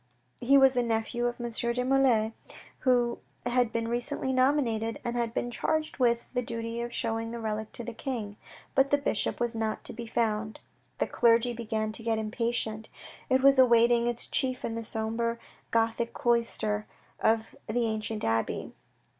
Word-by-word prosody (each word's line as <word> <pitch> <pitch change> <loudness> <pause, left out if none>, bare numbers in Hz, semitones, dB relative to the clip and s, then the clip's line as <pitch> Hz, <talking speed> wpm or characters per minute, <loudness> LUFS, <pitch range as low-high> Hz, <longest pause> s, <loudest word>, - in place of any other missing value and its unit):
He 270 +3 +5
was 270 -1 +6
a 245 - +3
nephew 235 +1 0
of 240 0 -4
M. 240 0 -4
de 235 +1 -1
la - - -3
Mole, 255 -5 +3 0.5
who 245 -2 +2 0.3
had 245 -1 +2
been 230 0 -1
recently 255 +3 -2
nominated, 255 -4 +1
and 240 0 -2
had 235 -1 0
been 240 +1 -2
charged 315 +4 -1
with 235 -1 +1
the 250 - +1
duty 230 0 -4
of 240 0 -4
showing 225 -1 -2
the 235 0 -5
relic 215 -1 -3
to 240 - -6
the 240 - -6
King. 225 -5 -4 0.4
But 270 +1 +4
the 285 - +4
bishop 285 - -1
was 240 0 0
not 220 -1 -2
to - - -8
be 235 +1 -7
found. 220 -1 -1 0.4
The - - +1
clergy 235 0 +3
began 220 -2 -2
to 215 - +1
get 225 -1 0
impatient. 220 0 -2 0.4
It 260 0 +3
was 275 -1 +6
awaiting 235 -1 +5
its 240 -1 -2
chief 255 -1 -1
in 225 - -3
the 230 0 -4
sombre 225 +1 -1 0.3
Gothic 230 +1 0
cloister 230 -3 0 0.3
of 225 0 +1
the 235 +2 0
ancient 220 -1 -2
abbey. 115 0 -1
235 Hz, 175 wpm, -29 LUFS, 225-245 Hz, 0.5 s, was